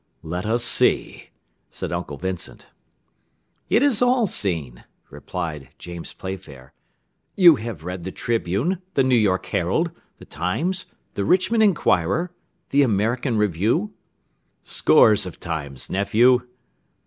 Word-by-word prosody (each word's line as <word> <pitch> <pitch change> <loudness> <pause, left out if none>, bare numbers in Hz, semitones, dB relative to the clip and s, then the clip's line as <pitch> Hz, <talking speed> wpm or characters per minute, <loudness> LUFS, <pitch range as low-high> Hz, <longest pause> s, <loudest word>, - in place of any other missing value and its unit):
"Let 90 +5 -4
us 120 +2 +1
see," - - +1 0.4
said - - -5
Uncle 75 - -4
Vincent. 95 +2 -6 1.0
"It 240 - +3
is 275 -7 +2
all 245 -1 +3
seen," 80 - -2 0.3
replied 75 -5 -6
James 85 -1 -8
Playfair. 80 -9 -9 0.6
"You 175 -6 +7
have 110 -8 -7
read 90 +1 -5
the 95 +2 -6
Tribune, 120 - -1
the 135 - +4
New 130 0 +2
York 100 -5 +2
Herald, - - 0 0.3
The - - -14
Times, 155 - -2 0.3
the 100 - -2
Richmond 190 - +2
Inquirer, 170 - +2 0.4
the 140 - +4
American 120 +1 +1
Review?" 105 - 0 0.7
"Scores 105 -4 +4
of 90 - -10
times, 70 -6 -5
nephew." 120 +6 +3
105 Hz, 120 wpm, -22 LUFS, 85-145 Hz, 1.0 s, You